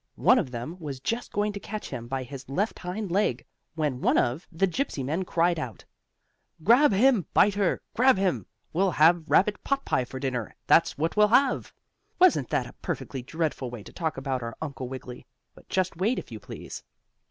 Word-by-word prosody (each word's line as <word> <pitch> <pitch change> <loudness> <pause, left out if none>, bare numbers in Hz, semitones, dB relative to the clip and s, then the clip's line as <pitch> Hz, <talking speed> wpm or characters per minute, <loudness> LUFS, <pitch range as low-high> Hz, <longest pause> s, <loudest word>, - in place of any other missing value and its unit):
One - - +5
of - - -2
them 130 +9 -6
was 145 -5 -6
just 230 - -3
going 205 0 0
to 200 - -5
catch 215 +1 -6
him 120 0 -5
by 130 +1 -3
his 130 0 -9
left 200 +11 -1
hind 185 +2 -4
leg, 200 +4 +1 0.3
when 150 -6 -1
one - - +3
of 125 +9 0
the 185 +3 +1
Gypsy 180 - -2
men 160 +7 -1
cried 170 -1 +1
out: 120 -8 -6 0.8
"Grab 245 - +6
him, 210 - +3
Biter! 200 -2 +3 0.2
Grab 255 -1 +5
him! 190 -2 0 0.3
We'll 190 +4 +2
have 165 +1 +5
rabbit 205 +2 +3
potpie 275 - 0
for 130 - -7
dinner; 130 -5 -3
that's - - +4
what 160 +3 -1
we'll 210 0 +6
have!" 255 +4 +2 0.5
Wasn't 365 -1 +4
that - - 0
a - - -11
perfectly 135 - -4
dreadful 150 -2 -3
way 120 -4 -8
to - - -13
talk 160 -4 -2
about 135 -1 -2
our 115 -1 -6
Uncle 140 -4 -5
Wiggily? 125 -1 -8 0.3
But - - -19
just 185 -1 0
wait, 205 +9 +1
if - - -6
you 110 - -7
please. - - -8
165 Hz, 190 wpm, -27 LUFS, 130-205 Hz, 0.8 s, Grab